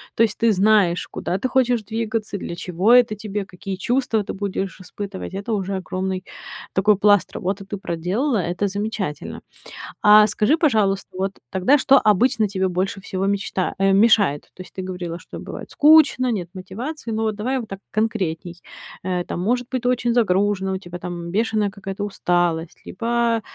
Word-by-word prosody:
То 230 - +4
есть 220 -2 0
ты 230 -1 +3
знаешь, 195 -3 +3
куда 185 - -3
ты 260 - -1
хочешь 250 -3 +2
двигаться, 220 -1 -3
для 170 - -6
чего 180 +6 +1
это 240 -4 +5
тебе, 205 -1 -4
какие 190 +1 -6
чувства 235 +1 0
ты 200 - -5
будешь 195 -1 -4
испытывать. 195 +1 -7
Это 200 +4 -4
уже 195 -1 -2
огромный 185 0 -3 0.5
такой 205 +2 +4
пласт 205 -1 +4
работы 195 +2 -3
ты 205 - -5
проделала, 195 - -1
это 180 +2 -1
замечательно. 200 -5 -4 0.6
А 210 0 +8
скажи, 215 +8 +2
пожалуйста, 215 - +1
вот 195 +1 -1 0.2
тогда, 190 +10 +3
что 275 0 +5
обычно 220 +2 +3
тебе 190 -1 -1
больше 185 +2 -2
всего 190 0 -3
мечта 195 -2 -1
а 195 0 +3 0.2
мешает? 200 -10 +2
То - - -11
есть - - -13
ты 190 - -5
говорила, 180 -2 -5
что - - -10
бывает - - -8
скучно, 295 -5 +5
нет 180 -6 -3
мотивации, 225 +9 -6
но 220 0 0
давай 245 +6 -2
вот 230 - -7
так 195 0 -7
конкретней. 185 -6 -2 0.4
Э, 180 -1 -1
там, - - -5
может 245 +5 0
быть, 255 -2 -3
очень 245 -1 +1
загружена, 195 -3 +1
у - - -1
тебя 175 -2 -9
там 170 -1 -6
бешеная 215 0 +1
какая-то 195 0 -6
усталость, 175 -4 -1
либо 235 +2 0
200 Hz, 170 wpm, -22 LUFS, 185-225 Hz, 0.6 s, А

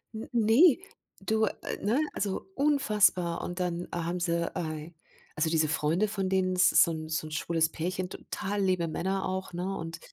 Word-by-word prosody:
N 220 - -6
ne, 240 +7 +5 0.4
du, 220 +2 +1 0.3
ne, 230 +8 +1
also 195 -2 -2
unfassbar. 210 - +2
Und 175 +1 -5
dann 175 -1 -2
haben 170 +1 -2
sie 170 -1 0
äh, 155 -1 -4 0.4
also 160 +1 +1
diese 160 -1 +2
Freunde, 160 +6 +1
von 195 -2 -2
denen 185 -1 +1
es 185 0 +5
ist - - +7
so 170 - 0
'n 155 -1 -5
so 155 0 -2
'n 155 - -10
schwules 160 +1 0
Pärchen 180 +2 -3
total 200 +1 -4
liebe 185 -3 +1
Männer 190 +4 -2
auch, 190 0 -3
ne, 185 +3 -3
und 165 -1 -6
180 Hz, 180 wpm, -29 LUFS, 165-200 Hz, 0.4 s, ist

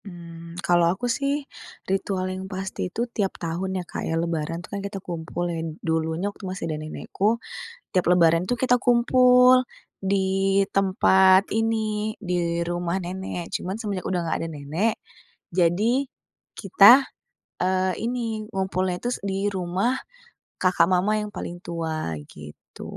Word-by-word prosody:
Mmm, 170 -2 -10
kalau 175 -1 +4
aku 190 +8 -2
sih 280 0 -1 0.4
ritual 190 -1 -1
yang 190 0 -6
pasti 190 -1 -4
itu 235 +6 -2
tiap 195 -3 -1
tahun 180 +3 -3
ya, 180 - -3
Kak, - - -6
ya 165 - 0
Lebaran 165 -1 -2
tuh - - -18
kan 200 - -3
kita 200 0 -5
kumpul 175 -1 -4
ya. 165 - -3 0.2
Dulunya 160 +2 -1
waktu - - -17
masih 185 -2 -4
ada 155 -2 -3
nenekku 200 +8 -1 0.5
tiap 185 - +1
Lebaran 170 0 +4
tuh 245 - +1
kita 250 0 +2
kumpul 250 +1 +5 0.3
di 195 0 +1
tempat 190 0 +4
ini 220 -1 -1
di 170 -2 -1
rumah 175 +1 -2
nenek, 180 -1 -5
cuman 185 +2 -4
semenjak 200 -5 -3
udah 180 -2 0
nggak 165 - -1
ada - - -4
nenek 155 +10 -1 0.6
jadi 205 +10 +2 0.5
kita, 205 +7 +7 0.6
eee, 185 0 +1
ini 230 -2 -2
ngumpulnya 190 -2 -1
tus 245 +4 -2
di 195 0 -1
rumah 185 +7 0 0.7
kakak 180 -2 +4
mama 190 +4 +2
yang 210 - -7
paling 175 -3 -6
tua 160 - -3 0.2
gitu, 75 -1 -12
190 Hz, 145 wpm, -24 LUFS, 170-210 Hz, 0.7 s, kita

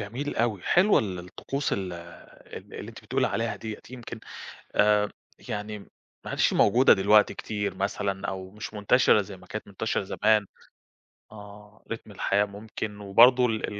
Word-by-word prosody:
جميل 120 +8 -4
أوي 110 -5 0
حلوة 190 +4 +4
ال 95 -4 -3
الطقوس 135 +10 -4
ال 95 -2 -2
ال 85 0 -12
اللي - - -7
أنتِ - - -12
بتقولي - - +1
عليها 115 0 -2
ديّة 110 -2 -7
يمكن 120 -2 -8 0.6
آمم 105 0 +4 0.4
يعني 105 +1 -4
م 100 - -15 0.4
ما - - -6
عَدِتش - - +2
موجودة 125 +6 +5
دلوقتي 105 +2 +4
كتير 105 -2 -3
مثلًا 100 0 -2
أو 95 -1 -5
مش 105 +1 -8
منتشرة 105 +1 +4
زي 95 -1 -10
ما 95 - -17
كانت 110 +3 -6
منتشرة 105 +2 -2
زمان. 105 +2 +2 0.9
آه، 105 0 -13
ريتم 110 -2 -6
الحياة 100 +1 +1
ممكن 105 0 -7
وبرضه 120 +6 +6
ال 110 -3 -1
105 Hz, 155 wpm, -27 LUFS, 100-110 Hz, 0.9 s, وبرضه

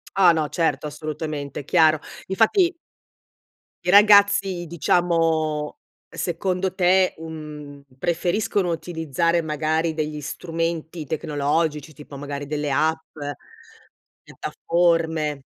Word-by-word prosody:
Ah 185 -3 +6
no, 155 -2 0
certo, 150 -3 0
assolutamente, 150 -2 -5
chiaro. 155 0 +4 0.3
Infatti 340 - +3 1.1
i 180 - +1
ragazzi, 200 -3 +5
diciamo, 160 -3 +1 0.3
secondo 185 +1 -2
te, 185 0 +3
uhm, 150 -3 -9
preferiscono 175 +4 0
utilizzare, 165 0 -1
magari, 160 +1 -1
degli 155 -1 -3
strumenti 165 +1 -4
tecnologici, 150 +1 -1
tipo, 145 0 -11
magari, 145 0 -5
delle 150 0 -2
app, 160 +4 0 1.1
piattaforme? 160 -4 0
160 Hz, 90 wpm, -23 LUFS, 150-175 Hz, 1.1 s, Ah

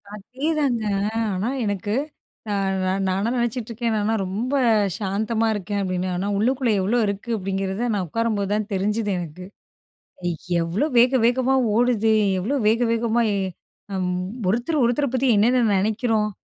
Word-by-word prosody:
அதேதாங்க. 260 +2 -1 0.5
ஆனா, 195 +6 -1 0.2
எனக்கு 205 +1 -2 0.6
நா - - 0 0.5
நானா 195 +4 0
நெனச்சிட்டுருக்கேன், 235 -1 -2
"நானா 210 +2 0
ரொம்ப 225 +9 -3 0.4
சாந்தமா 220 +3 -1
இருக்கேன்." 205 0 -3
அப்படீன்னு. 185 -1 -2
"ஆனா, 195 +3 -2
உள்ளுக்குள்ள 245 +2 +1
எவ்வளோ 225 +6 +1
இருக்கு?" 200 +4 -4
அப்படீங்கிறத 195 +4 -2
நான் 190 -3 -1
உட்காரம்போது 210 -2 -1
தான் 215 0 -1
தெரிஞ்சுது 205 +2 0
எனக்கு. 175 +2 -7 1.2
எவ்வளோ 170 - 0
வேக 255 +2 +5
வேகமா 260 +2 +2 0.2
ஓடுது. 230 -2 +3 0.3
எவ்வளோ 265 +10 -1
வேக 230 +3 +3
வேகமாய் 230 -1 +1 0.6
அம். 185 -1 -1 0.4
ஒருத்தர் 245 - +1
ஒருத்தரை 245 +3 +1
பத்தி, 255 0 +2
என்னென்ன 240 +3 +3
நெனைக்கிறோம்?" 215 +1 +1
220 Hz, 125 wpm, -23 LUFS, 200-240 Hz, 1.2 s, வேக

